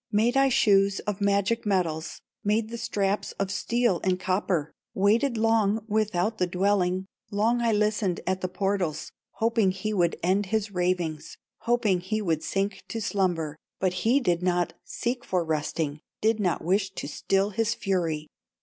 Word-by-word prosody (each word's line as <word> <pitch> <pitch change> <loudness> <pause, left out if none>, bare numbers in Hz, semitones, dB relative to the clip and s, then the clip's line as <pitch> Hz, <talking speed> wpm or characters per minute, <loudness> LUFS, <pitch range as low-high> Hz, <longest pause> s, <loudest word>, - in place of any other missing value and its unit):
Made 225 +4 +2
I 270 0 +5
shoes 200 -5 +4
of 210 -1 -4
magic 200 +3 +1
metals, 170 -6 -1 0.2
Made 215 +2 +1
the 235 - -5
straps 205 -3 -1
of 195 -1 -2
steel 235 -2 +1
and 185 -1 +1
copper, 185 -4 -1 0.2
Waited 225 +6 +2
long 220 -1 +2
without 215 -1 0
the 180 - +2
dwelling, 185 0 +1 0.2
Long 225 +3 +1
I 230 -1 +2
listened 210 -3 +1
at 185 +1 -1
the 185 - 0
portals, 185 -4 -2 0.2
Hoping 225 -3 +2
he 195 +3 -2
would 175 -4 +2
end 190 +3 +2
his 215 0 -1
ravings, 180 -4 -2 0.3
Hoping 230 -6 +2
he 215 +5 -2
would 165 -6 -1
sink 195 +3 -1
to 225 - -4
slumber, 175 -7 -1 0.2
But 185 -1 +1
he 240 +7 +4
did 175 -9 +1
not 180 -1 +1
seek 245 +1 -3
for 180 -2 0
resting, 155 -1 -2 0.2
Did 220 +1 +2
not 180 -5 0
wish 190 +3 +1
to - - -4
still 195 +7 0
his 225 +3 0
fury. 165 -5 -1
195 Hz, 160 wpm, -27 LUFS, 180-220 Hz, 0.3 s, I